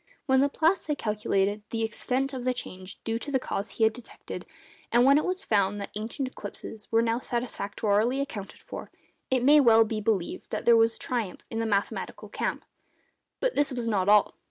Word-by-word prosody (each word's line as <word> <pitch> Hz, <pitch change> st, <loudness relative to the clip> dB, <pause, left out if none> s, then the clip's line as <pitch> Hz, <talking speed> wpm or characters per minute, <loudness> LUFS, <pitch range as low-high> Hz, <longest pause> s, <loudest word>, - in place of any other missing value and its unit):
When 265 Hz, -2 st, +4 dB
Laplace 315 Hz, +6 st, +2 dB
had 300 Hz, -2 st, -1 dB
calculated 210 Hz, -2 st, 0 dB
the 225 Hz, -1 st, -2 dB
extent 260 Hz, +4 st, -1 dB
of 255 Hz, -2 st, -4 dB
the 255 Hz, 0 st, 0 dB
change 185 Hz, -5 st, -6 dB
due 225 Hz, 0 st, -1 dB
to 290 Hz, -, -7 dB
the 265 Hz, -, +3 dB
cause 205 Hz, -5 st, -3 dB
he 225 Hz, -, -1 dB
had 220 Hz, 0 st, +4 dB
detected, 245 Hz, -1 st, -9 dB, 0.4 s
and 240 Hz, +1 st, +5 dB
when 280 Hz, +2 st, +6 dB
it -, -, -2 dB
was 370 Hz, +1 st, -2 dB
found 205 Hz, -1 st, +2 dB
that 200 Hz, -, -6 dB
ancient 225 Hz, +5 st, -3 dB
eclipses 215 Hz, -2 st, -8 dB
were 225 Hz, 0 st, +4 dB
now 230 Hz, +1 st, +1 dB
satisfactorily 230 Hz, 0 st, 0 dB
accounted 225 Hz, -8 st, -5 dB
for, -, -, -8 dB, 0.4 s
it 255 Hz, -2 st, +1 dB
may 295 Hz, +3 st, +7 dB
well 225 Hz, -4 st, +7 dB
be 215 Hz, -1 st, -3 dB
believed 200 Hz, -4 st, -1 dB
that -, -, -4 dB
there 235 Hz, -, +7 dB
was 225 Hz, 0 st, +4 dB
triumph 230 Hz, -7 st, -3 dB
in 225 Hz, -, -2 dB
the 225 Hz, -, 0 dB
mathematical 200 Hz, -2 st, -2 dB
camp. -, -, -3 dB, 0.7 s
But -, -, +1 dB
this 290 Hz, -1 st, +2 dB
was 245 Hz, -2 st, -3 dB
not 200 Hz, -3 st, +1 dB
all. 210 Hz, -1 st, +5 dB
230 Hz, 195 wpm, -27 LUFS, 210-260 Hz, 0.7 s, may